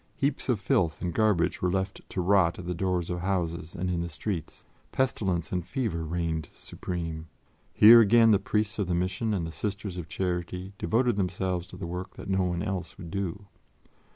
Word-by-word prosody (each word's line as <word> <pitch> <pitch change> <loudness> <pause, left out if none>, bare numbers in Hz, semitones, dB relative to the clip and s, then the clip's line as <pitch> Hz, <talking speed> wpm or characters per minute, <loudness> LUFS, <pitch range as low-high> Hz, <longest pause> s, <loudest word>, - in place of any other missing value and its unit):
Heaps 140 -1 -1
of 120 -4 +2
filth 85 -5 +1
and 85 -2 -1
garbage 105 -4 +2
were 90 - +2
left 95 +1 -2
to 95 - -2
rot 90 -2 +3
at 90 - -7
the 90 - -2
doors 90 -1 -1
of 90 - -2
houses 85 -2 -2
and 90 +2 -2
in 90 -2 0
the 85 - -3
streets; 85 +2 -5 0.3
pestilence 95 -10 0
and 90 -1 -1
fever 110 - -2
reigned 80 -2 -2
supreme. 80 -3 -5 0.5
Here, 115 +2 +10
again, 115 +1 +6
the 100 - +5
Priests 105 +1 -1
of 100 - 0
the 90 - 0
Mission 90 +6 -1
and 95 -5 0
the 80 - -5
Sisters 100 0 -4
of 80 -3 -6
Charity 90 +1 -3
devoted 120 -1 +1
themselves 90 -2 -1
to - - -11
the 95 - -5
work 90 +2 -6
that - - -6
no 95 0 +2
one 90 -1 -1
else 100 -4 -4
would 85 -4 -9
do. 100 0 -3
90 Hz, 195 wpm, -28 LUFS, 85-100 Hz, 0.5 s, Here